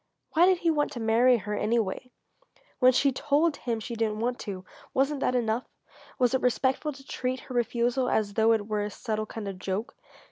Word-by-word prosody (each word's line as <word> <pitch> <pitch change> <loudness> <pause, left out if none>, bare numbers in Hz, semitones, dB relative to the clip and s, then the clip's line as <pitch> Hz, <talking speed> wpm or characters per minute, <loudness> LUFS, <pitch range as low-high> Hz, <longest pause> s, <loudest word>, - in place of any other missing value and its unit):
Why 340 +3 +5
did 375 -1 +4
he 340 -1 +1
want 295 -2 0
to 245 - -5
marry 235 +3 +4
her, 210 0 -5
anyway? 225 +2 -1 0.7
When 255 -1 +7
she 275 +2 +3
told 295 +4 +1
him 230 -2 -2
she 230 +2 -6
didn't 220 -2 -1
want 245 +2 -1
to 190 -3 -6 0.3
wasn't 275 +2 +1
that 255 - 0
enough? 235 0 0 0.5
Was 250 -2 +2
it 260 - +1
respectful 260 +4 +1
to 270 -1 -13
treat 255 -1 -3
her 255 - -10
refusal 245 +1 +1
as 205 -2 0
though 225 +1 +4
it 215 -2 0
were 210 -1 -1
a 205 - -2
subtle 215 0 -3
kind 215 -2 -6
of 195 -2 -6
joke? 200 +8 -3
240 Hz, 205 wpm, -27 LUFS, 215-265 Hz, 0.7 s, When